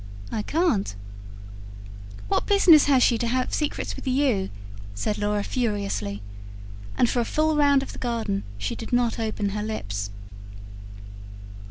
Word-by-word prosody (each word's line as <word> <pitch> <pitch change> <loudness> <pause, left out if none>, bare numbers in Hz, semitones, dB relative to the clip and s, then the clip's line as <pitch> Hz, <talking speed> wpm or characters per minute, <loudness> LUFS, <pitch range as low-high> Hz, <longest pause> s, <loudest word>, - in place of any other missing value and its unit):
I 215 - -1
can't. 270 - 0 1.3
"What - - 0
business 365 -7 +6
has 270 -3 +4
she 235 -2 +3
to 235 - 0
have 255 +2 0
secrets 300 -2 -2
with - - -9
you?" 255 -7 +1 0.5
said 205 - -2
Laura 205 0 0
furiously. 200 - -2 0.7
And 245 - +4
for 245 - 0
a - - +2
full 310 +5 +1
round 285 -2 +4
of - - -8
the - - -10
garden 230 - -1 0.2
she 100 0 -3
did 225 - -8
not 245 -1 +1
open 215 -2 -1
her 210 +1 -3
lips. 100 - -4
230 Hz, 145 wpm, -25 LUFS, 205-275 Hz, 1.3 s, business